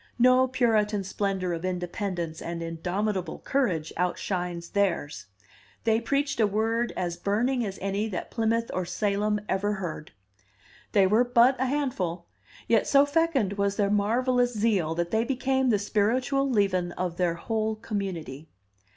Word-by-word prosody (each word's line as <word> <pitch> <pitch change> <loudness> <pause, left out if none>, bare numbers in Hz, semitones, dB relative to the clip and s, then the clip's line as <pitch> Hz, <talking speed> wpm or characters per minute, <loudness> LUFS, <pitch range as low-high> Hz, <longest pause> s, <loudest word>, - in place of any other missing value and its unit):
No 255 +1 +5
Puritan 220 -5 +1
splendor 190 -2 -2
of 165 0 -4
independence 180 -2 -3
and 170 0 -4
indomitable 180 +4 -2
courage 185 - -1
outshines 175 -1 -2
theirs. 185 -7 -1 0.6
They 225 0 +2
preached 280 0 -1
a 220 - +4
word 225 +3 0
as 175 -1 -2
burning 235 +7 0
as 195 -3 -4
any 200 +2 -1
that 185 - -5
Plymouth 230 0 0
or 185 - -1
Salem 205 +3 0
ever 205 +2 0
heard. 170 -6 -5 0.8
They 200 -2 +5
were 215 +6 +4
but 245 +1 +4
a 260 - +1
handful, 200 - -2 0.4
yet 225 -3 +3
so 280 0 +5
fecund 285 - +1
was 200 0 +1
their 200 -1 +1
marvelous 245 +4 +2
zeal 200 -7 +1
that 170 0 -2
they 220 +1 +2
became 265 +1 0
the 215 - +4
spiritual 245 +7 +1
leaven 190 -6 +1
of 180 -2 -3
their 175 -2 +1
whole 220 +4 -2
community. 180 -9 -5
205 Hz, 145 wpm, -27 LUFS, 180-235 Hz, 0.8 s, No